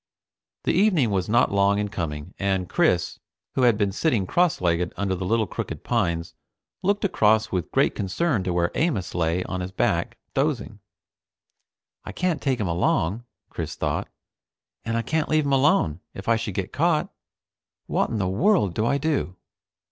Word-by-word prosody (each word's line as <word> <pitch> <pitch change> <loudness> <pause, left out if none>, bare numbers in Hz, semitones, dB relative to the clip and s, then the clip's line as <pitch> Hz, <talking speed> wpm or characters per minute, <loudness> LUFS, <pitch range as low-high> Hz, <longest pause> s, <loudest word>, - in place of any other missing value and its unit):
The - - +1
evening 175 - +3
was 95 -2 -1
not 120 +3 +3
long 100 0 +3
in 105 0 0
coming, 80 -3 -5
and 95 -2 0
Chris, - - +1 0.3
who - - 0
had 120 -4 +4
been 100 -2 +1
sitting 110 - +1
cross 175 - +2
legged 90 0 +1
under 100 0 0
the 95 0 -3
little 115 +1 +2
crooked - - -5
pines, 85 -7 -1 0.5
looked 200 +2 +1
across 110 - +3
with 90 -3 -2
great - - +2
concern 105 - -1
to 90 - 0
where 85 0 +1
Amos 145 - -1
lay 85 +1 0
on 90 0 -4
his 90 +1 -5
back, 95 - 0 0.2
dozing. - - -1 1.2
I - - -8
can't 180 -3 -1
take 130 -3 0
him 105 - -1
along, 85 +5 0 0.3
Chris - - -5
thought, - - -2 0.8
and 115 0 -1
I 115 - -1
can't 155 +6 -1
leave 155 -1 +2
him 140 - +1
alone, 130 - +3 0.2
if 95 - -8
I 115 - +4
should 110 -4 -4
get 95 -2 -3
caught. 160 0 +1 0.7
What - - 0
in 115 - -2
the 95 -3 0
world 105 - +2
do 110 +5 0
I 140 - +2
do? 140 - -1
105 Hz, 175 wpm, -24 LUFS, 90-140 Hz, 1.2 s, had